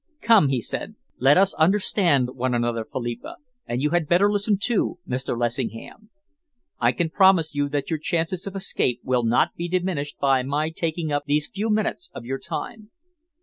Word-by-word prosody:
"Come," 220 -10 +5
he 135 -2 +1
said, - - -4 0.2
"let 135 +5 +5
us 195 +1 +4
understand 170 - +3
one 130 -1 -1
another, 120 -1 -1
Philippa, 120 0 -6 0.3
and 120 +3 -2
you 150 - +1
had 175 -3 +1
better 190 +5 +4
listen, 205 0 +1
too, 215 0 0
Mr. 125 -1 -3
Lessingham. 120 - -4 0.7
I 120 0 +3
can 160 +6 -2
promise 190 -5 +4
you 145 0 -1
that 145 0 -3
your 160 - -1
chances 170 +4 -2
of 195 - -6
escape 130 -10 -1
will 125 -1 +1
not 115 +1 +2
be 170 - -4
diminished 175 -5 -2
by 135 -2 +2
my 145 +4 -1
taking 160 -1 -3
up 145 0 -1
these 150 +1 0
few 210 +3 -2
minutes 215 +11 -1
of 115 - -8
your 135 +2 -3
time. 220 -3 -6
150 Hz, 180 wpm, -23 LUFS, 130-190 Hz, 0.7 s, Come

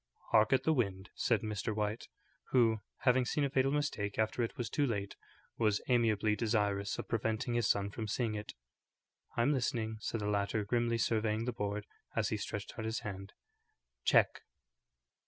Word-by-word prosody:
"Hark 110 -1 +5
at 135 - +4
the 160 - +3
wind," 100 -7 -1
said 115 -3 +1
Mr. 105 0 -2
White, 105 +1 -2 0.4
who, 115 -4 +4 0.2
having 125 +1 +4
seen 145 +4 0
a 140 - 0
fatal 135 0 +2
mistake 110 -9 -1
after 110 +2 +1
it 115 - -2
was 120 - -2
too 145 +6 +1
late, 100 -4 -2 0.4
was 105 -3 +3
amiably 110 -4 +3
desirous 105 -3 0
of - - -5
preventing 110 +1 -1
his 120 -4 +2
son 100 0 +1
from 110 +1 -4
seeing 110 +1 0
it. 105 0 -6 0.8
"I'm 120 +5 +3
listening," 115 -4 -1
said 110 0 -3
the 105 - -1
latter, 105 +1 0
grimly 120 +1 +1
surveying 110 -1 +1
the 125 - -1
board 105 -1 -3 0.3
as - - +1
he - - -1
stretched - - -5
out 110 - -3
his 110 +1 -2
hand. 95 -1 -6 0.7
"Check." - - +4
110 Hz, 175 wpm, -34 LUFS, 105-120 Hz, 0.8 s, Hark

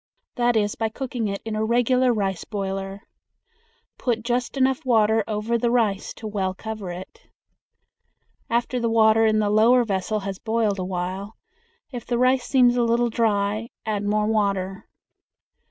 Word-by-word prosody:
That 240 -1 +1
is 205 -1 +1
by 225 -1 -2
cooking 245 -1 -4
it 200 0 -4
in 220 -1 -3
a 215 - 0
regular 245 +2 +2
rice 195 -5 -1
boiler. 195 0 -5 1.0
Put 230 -3 -1
just 245 +1 -2
enough 265 0 +1
water 220 -3 +3
over 220 +2 -1
the 235 - +1
rice 220 -5 0
to 225 - -10
well 190 -3 -2
cover 215 -2 -6
it. 185 - -10 1.2
After 240 +1 0
the 235 -1 0
water 225 0 +4
in 215 0 +2
the 210 -1 +1
lower 235 +4 +5
vessel 210 0 -2
has 195 0 -5
boiled 220 -3 0
a - - -2
while, 185 +3 -4 0.5
if 245 -3 -6
the 240 - -2
rice 255 +1 +2
seems 245 -2 +4
a - - +3
little 235 0 +1
dry, 215 0 0 0.2
add 210 -2 -2
more 210 +1 +1
water. 200 -3 -1
220 Hz, 160 wpm, -23 LUFS, 200-240 Hz, 1.2 s, lower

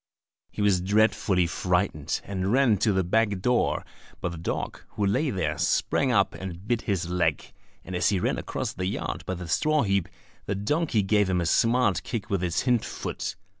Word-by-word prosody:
He 105 - -3
was 95 -3 +3
dreadfully 100 -2 +2
frightened, 90 -3 -1
and 95 0 -2
ran 125 -4 +4
to 105 - +3
the 95 -1 +1
back 105 +2 +1
door, 125 +5 +1 0.3
but 90 - -2
the 85 - -7
dog, 80 - -3
who 105 - 0
lay 105 +10 +1
there 80 - -2
sprang 135 -2 +1
up 100 -4 +3
and 95 +1 -8
bit 120 -1 +1
his 95 -5 -1
leg; 90 -1 0 0.3
and 90 - -5
as 90 - +2
he 100 -2 +1
ran - - 0
across - - -4
the 90 - -3
yard - - -3
by 95 - -2
the 90 -1 -7
straw 155 - +2
heap, 100 -4 0 0.4
the 100 - -1
donkey 115 - 0
gave 105 0 +2
him 90 -1 +1
a 85 - -1
smart 115 -3 +3
kick 110 - -5
with 100 -3 +1
its 85 -2 0
hind 125 -3 +2
foot. - - -4
100 Hz, 195 wpm, -26 LUFS, 90-110 Hz, 0.4 s, ran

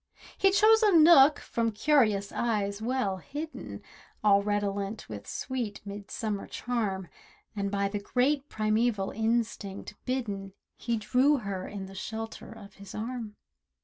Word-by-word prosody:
He 390 - +4
chose 435 +3 +5
a 420 -3 +4
nook, 310 -3 +8
from 230 -1 -1
curious 215 -5 +2
eyes 210 -3 -1
well 225 -5 0
hidden— 295 - -7 0.4
All 200 -1 +5
redolent 205 0 -2
with 105 -2 -8
sweet 245 -6 -4
midsummer 205 +1 -4
charm, 205 -7 -2 0.5
And 200 -1 -1
by 200 0 0
the 205 +1 -3
great 270 +7 0
primeval 215 -1 0
instinct 220 -3 -2
bidden, 205 -7 -3 0.2
He 235 -1 -2
drew 260 +7 +3
her 195 -6 -4
in 200 -2 -6
the 190 - -11
shelter 220 +4 -6
of 210 -3 -12
his 200 -1 -10
arm. 225 -1 -5
215 Hz, 135 wpm, -29 LUFS, 200-250 Hz, 0.5 s, nook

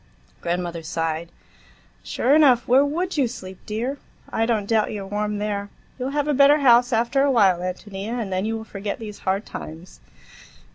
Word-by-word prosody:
Grandmother 175 -1 -2
sighed. 165 0 -3 0.7
"Sure 265 - +1
enough, 275 -6 +5
where 260 +3 +5
would 335 +5 -2
you 270 -4 +3
sleep, 190 -5 -9
dear! 240 +6 -3 0.3
I 225 0 +1
don't 220 -4 0
doubt 220 0 +1
you're 205 -2 -5
warm 210 +1 -2
there. 205 -1 -3 0.3
You'll 255 +1 -2
have 290 +1 -1
a 300 - +2
better 280 +2 +6
house 245 -1 +5
after 250 +5 +2
while, 200 -9 +4
Ántonia, 195 +5 -5
and 200 -5 -3
then 185 +1 0
you'll 225 0 -3
forget 200 -1 -5
these 210 -2 -8
hard 195 +3 -1
times." 165 +3 -9
215 Hz, 165 wpm, -23 LUFS, 195-255 Hz, 0.7 s, better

